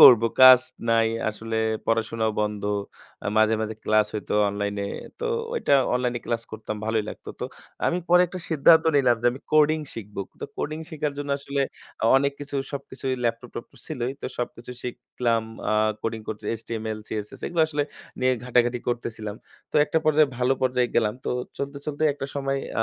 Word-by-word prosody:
করব 120 -3 +10 0.2
কাজ 130 -1 +11 0.3
নাই, 115 -1 +4 0.2
আসলে 110 +1 -5 0.3
পড়াশোনাও 115 0 +1
বন্ধ 105 -1 -1 0.6
আ - - -1
মাঝে, 110 0 +5
মাঝে, 110 0 -2
ক্লাস 110 -1 +4
হইতো 105 - -3
অনলাইনে। 100 0 -2 0.3
তো 475 - -1 0.3
ওইটা 460 - +3 0.2
অনলাইন 125 -1 0
ক্লাস 115 -1 -1
করতাম 110 -1 -5
ভালোই 110 -1 +1
লাগতো। - - -10
তো - - -1 0.4
আমি 175 - +1
পরে 180 +1 +7
একটা 185 +2 -7
সিদ্ধান্ত 160 +1 +6
নিলাম 125 -4 +4
যে - - +3
আমি 130 - -9
কোডিং 155 +1 +5 0.2
শিখব। 105 -2 -9 0.2
তো - - -3
কোডিং 155 +1 -3
শিখার 150 -2 -2
জন্য 145 0 -3
আসলে 140 0 -3 0.4
আ - - +2
অনেক 140 +1 +2
কিছু 145 0 -4 0.2
সবকিছুই 135 -1 -3
ল্যাপটপ-ট্যাপটপ 115 +1 -4
ছিলই 125 +1 -2
তো - - -2
সবকিছু 120 0 -5
শিখলাম। 120 -1 -1 0.3
আ - - +3 0.3
কোডিং 115 0 -2
করতে 110 0 -5 0.2
HTML 110 -1 -4
CSS 105 -1 -5
এগুলো 170 -2 +2
আসলে 150 -1 0 0.4
নিয়ে 130 0 +4
ঘাটাঘাটি 125 0 +2
করতেছিলাম। 110 -3 -3 0.3
তো - - 0
একটা 150 +2 +1
পর্যায়ে 155 -2 +4
ভালো 125 +1 +3
পর্যায়ে 125 -1 +2
গেলাম। 105 -2 +2
তো - - -1 0.3
চলতে, 140 0 -4
চলতে, 150 0 -3
একটা 135 - -5
সময় 135 -1 -1 0.2
আ - - +5
120 Hz, 170 wpm, -25 LUFS, 110-140 Hz, 0.6 s, কাজ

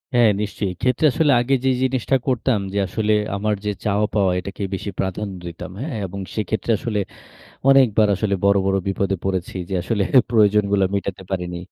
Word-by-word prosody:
হ্যাঁ, 120 -2 +6
নিশ্চয়ই। 105 -1 -2
এক্ষেত্রে 125 - 0
আসলে 150 +2 +2
আগে 125 +3 0
যে - - +4
জিনিসটা 130 0 +1
করতাম 125 -3 +1
যে, - - -2
আসলে 110 -1 0 0.2
আমার 105 +2 0
যে 105 - +1
চাওয়া-পাওয়া 105 -2 +1
এটাকে 100 +2 -6
বেশি 95 +2 -4
প্রাধান্য 95 +1 -2
দিতাম। 85 +2 -8
হ্যাঁ? 140 -4 -4
এবং 100 +2 -7 0.2
সেক্ষেত্রে 110 +1 -1
আসলে 110 -3 -2 0.7
অনেকবার 120 -6 +5
আসলে 100 0 0
বড়, 100 0 +5
বড় 95 0 +2
বিপদে 95 0 0
পড়েছি 95 -1 -2
যে, 95 - -3
আসলে 100 +2 0 0.3
প্রয়োজনগুলো 105 -3 +3
মেটাতে 100 -1 -3
পারিনি। 90 -2 -3
105 Hz, 165 wpm, -21 LUFS, 95-115 Hz, 0.7 s, হ্যাঁ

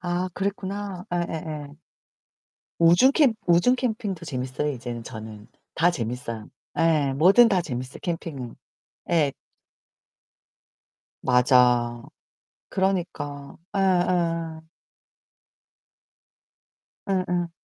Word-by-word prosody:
아 175 +1 -1
그랬구나. 195 -1 -4
예예예. 160 -4 -3 1.1
우중 175 +11 +6
캠 280 -8 +4
우중 175 +9 +4
캠핑도 215 -8 -3
재밌어요 130 +1 -3
이제는 120 -2 -6
저는. 110 -2 -9 0.3
다 170 +3 +4
재밌어요. 115 -6 -5 0.3
예, 155 -4 +3
뭐든 190 - +6
다 190 -3 +3
재밌어요 130 -4 -5
캠핑은. 160 -8 -4 0.6
예. 155 -5 +3 1.9
맞아. 125 -1 +3 0.7
그러니까. 165 -7 -2 0.2
예예. 175 -4 +1 2.5
응응. 180 -2 0
165 Hz, 175 characters per minute, -25 LUFS, 130-185 Hz, 2.5 s, 우중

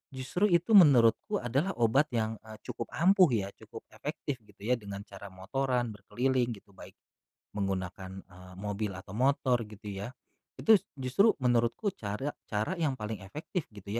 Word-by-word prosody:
justru 135 +11 +1
itu 175 +4 +2
menurutku 150 - +6
adalah 140 +11 0
obat 120 +6 +3
yang, 110 -1 -1
eee, 110 0 -11
cukup 125 -1 -5
ampuh 185 +2 +6
ya, 100 -2 -2
cukup - - -11
efektif 135 -3 -5
gitu 105 -3 -23
ya 125 +2 +1
dengan 100 -1 -7
cara 100 0 -10
motoran 120 +6 -1
berkeliling 120 +4 -1
gitu, 100 0 -18
baik - - -13 0.6
menggunakan, 95 -1 -4
eee, 90 0 -14
mobil 105 +1 -3
atau 95 0 -10
motor 125 0 +2
gitu 105 0 -14
ya. 100 +4 -5 0.5
Itu 220 - +5 0.2
justru 135 - +3
menurutku 125 - +1
cara 105 +8 -4 0.2
cara 110 - -1
yang 145 -6 0
paling 105 -2 -5
efektif 150 - -5
gitu 100 -2 -12
115 Hz, 155 wpm, -30 LUFS, 100-135 Hz, 0.6 s, menurutku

